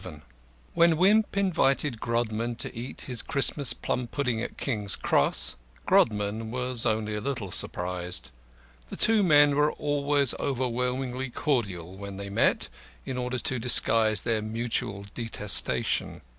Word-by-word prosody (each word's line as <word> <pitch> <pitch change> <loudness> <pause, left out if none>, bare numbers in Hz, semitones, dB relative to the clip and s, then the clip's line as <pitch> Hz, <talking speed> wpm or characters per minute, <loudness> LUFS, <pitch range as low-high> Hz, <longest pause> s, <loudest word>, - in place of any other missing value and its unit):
VII 75 -5 -10 0.5
When 170 -1 +3
Wimp 205 +4 +2
invited 145 - 0
Grodman 115 0 -2
to - - -5
eat 120 +3 -7
his 125 -3 0
Christmas 140 -2 +4
plum 125 -1 -3
pudding 125 -3 -2
at - - -6
King's 105 -7 -1
Cross, - - 0 0.3
Grodman 105 0 +1
was 125 0 -2
only 110 0 -1
a 105 - -3
little 125 -8 -4
surprised. 90 -6 -1 0.6
The - - -9
two 220 -1 +4
men 145 -5 +4
were 150 +1 +2
always 145 -2 0
overwhelmingly 125 0 -2
cordial 100 - -2
when 100 0 -8
they 100 0 -7
met, - - +1 0.4
in 130 - -5
order 125 0 -3
to 125 0 -2
disguise 110 -3 +4
their 115 -2 -1
mutual 110 -2 -4
detestation. 110 -3 0
120 Hz, 135 wpm, -26 LUFS, 105-140 Hz, 0.6 s, Christmas